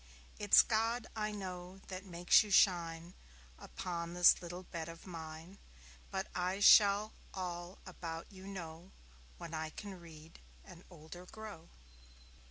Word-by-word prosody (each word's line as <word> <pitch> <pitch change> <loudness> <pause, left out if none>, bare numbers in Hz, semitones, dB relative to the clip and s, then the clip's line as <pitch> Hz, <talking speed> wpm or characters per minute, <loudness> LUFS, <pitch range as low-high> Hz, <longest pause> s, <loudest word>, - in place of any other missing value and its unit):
It's 205 -1 +7
God, 225 +1 0
I 215 -1 -1
know, 185 -2 -7
that 185 0 -6
makes 175 -2 +4
you 215 - -5
shine 170 -3 +3 0.5
Upon 170 -1 -5
this 175 -1 +6
little 175 +1 -7
bed 165 -2 -6
of 165 0 -11
mine; 165 +1 -9 0.5
But - - -2
I 180 +2 -1
shall 205 +1 +6 0.2
all 180 0 -5
about 165 -1 -6
you 190 0 -11
know 175 -2 -8 0.4
When 165 - -8
I 160 0 -3
can 195 +2 -9
read 160 -1 -13 0.3
and 180 -2 -13
older 175 +1 -11
grow. 210 -7 -10
180 Hz, 135 wpm, -35 LUFS, 165-195 Hz, 0.5 s, It's